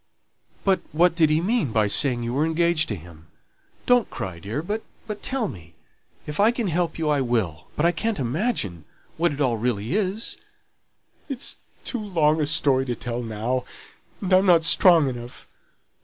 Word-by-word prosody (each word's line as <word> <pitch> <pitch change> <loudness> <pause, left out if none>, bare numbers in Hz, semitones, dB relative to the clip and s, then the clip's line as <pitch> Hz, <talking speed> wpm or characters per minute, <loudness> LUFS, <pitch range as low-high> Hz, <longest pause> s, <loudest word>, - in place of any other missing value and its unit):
"But 195 -1 +3
what 170 +2 +3
did 160 -3 +4
he 155 +1 +2
mean 190 - 0
by 110 -1 +2
saying 120 +3 +2
you 120 +1 -3
were 140 +4 +1
engaged 165 0 +2
to 105 - -1
him? 80 -2 -14 0.6
Don't 245 -2 +3
cry, 95 -3 -6
dear, 110 - -4
but 210 +5 -3 0.4
tell 265 -5 -1
me; 85 - -11 0.5
if 150 +3 -6
I 210 +2 +6
can 235 -4 -1
help 170 0 -1
you 160 -2 -2
I 145 -2 +2
will, 105 -11 -1
but 150 - +1
I 170 - +5
can't 220 +5 -2
imagine 125 - -2 0.3
what 170 0 +2
it 145 - -6
all 125 -5 +1
really 115 +2 -2
is." 205 +2 -1 0.9
"It's 275 -1 -2 0.3
too 245 - -2
long 160 -6 +2
a 150 - +1
story 140 -4 +2
to 120 - -1
tell 120 0 -4
now, 115 +3 -2 0.6
and 190 -1 -1
I'm 190 +1 +5
not 170 -3 +5
strong 165 -1 +6
enough. 120 -1 -7
150 Hz, 175 wpm, -24 LUFS, 120-180 Hz, 0.9 s, I